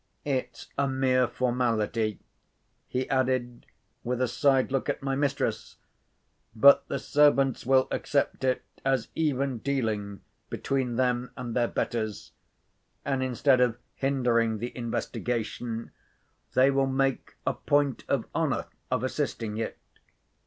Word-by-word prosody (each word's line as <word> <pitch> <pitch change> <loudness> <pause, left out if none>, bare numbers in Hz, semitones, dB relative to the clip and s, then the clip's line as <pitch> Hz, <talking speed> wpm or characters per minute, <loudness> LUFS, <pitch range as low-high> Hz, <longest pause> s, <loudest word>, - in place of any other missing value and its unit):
It's 135 -3 -3
a 140 - +3
mere 130 -1 +2
formality," 115 -4 0 0.7
he 130 +1 -2
added, 130 -2 0 0.4
with 125 +1 -2
a 130 - +2
side 135 +2 +2
look 135 -1 -1
at - - -2
my 135 -1 0
mistress; 140 0 -1 0.8
"but 140 +6 +7
the 140 - -2
servants 140 -2 +3
will 130 0 +4
accept 140 -2 0
it 130 -1 +1 0.2
as 135 -3 +1
even 140 -5 0
dealing 110 -7 -2 0.3
between 130 -3 -1
them 125 0 +1
and 120 -3 -5
their 120 -1 +2
betters; 110 -4 -3 0.7
and, 135 -1 0
instead 130 +1 +3
of 120 -2 +2 0.2
hindering 120 -5 +1
the 120 +3 -5
investigation, 115 -1 -3 0.6
they 130 +2 +6
will 135 0 +2
make 135 0 -1
a - - +1
point 145 -3 +1
of - - 0
honour - - 0 0.2
of 125 -1 0
assisting 120 -5 -2
it." 115 - -3
130 Hz, 125 wpm, -28 LUFS, 120-135 Hz, 0.8 s, but